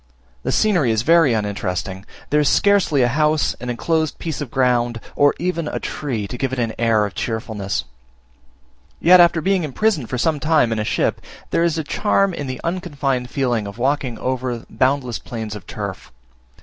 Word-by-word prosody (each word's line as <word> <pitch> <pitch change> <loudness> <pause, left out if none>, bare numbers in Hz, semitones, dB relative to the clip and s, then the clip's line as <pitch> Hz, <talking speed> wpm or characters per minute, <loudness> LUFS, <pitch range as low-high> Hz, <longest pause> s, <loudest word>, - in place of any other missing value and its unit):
The - - -2
scenery 180 - +2
is 110 0 +1
very 165 -2 +5
uninteresting; 95 -2 -3 0.2
there 150 - +4
is 150 - +3
scarcely 195 -9 +3
a - - +4
house, 150 +3 +1
an 125 - -5
enclosed 160 +5 -1
piece 160 -3 -4
of 145 - -4
ground, 120 -2 +1 0.2
or 145 0 +4
even 170 -2 -2
a - - -3
tree, 120 -9 -3
to 125 - -7
give 135 -2 -1
it 130 - -3
an 115 -2 -1
air 115 -2 +3
of 100 - -6
cheerfulness 110 -4 -3 1.2
Yet, 180 +2 +7
after 170 -1 +5
being 190 +1 +1
imprisoned 155 - 0
for 125 - -2
some 155 +4 +1
time 150 -6 +2
in 110 - -1
a - - 0
ship, - - 0 0.3
there 165 - +2
is 170 -1 +1
a 160 - -1
charm 195 +4 +1
in 145 -4 -5
the 130 0 -5
unconfined 145 -8 -2
feeling 120 -7 -1
of 100 - -9
walking 130 -2 0
over 125 -2 -3
boundless 130 -3 0
plains 110 -3 -6
of 105 - -10
turf. - - -6
130 Hz, 185 wpm, -20 LUFS, 115-160 Hz, 1.2 s, Yet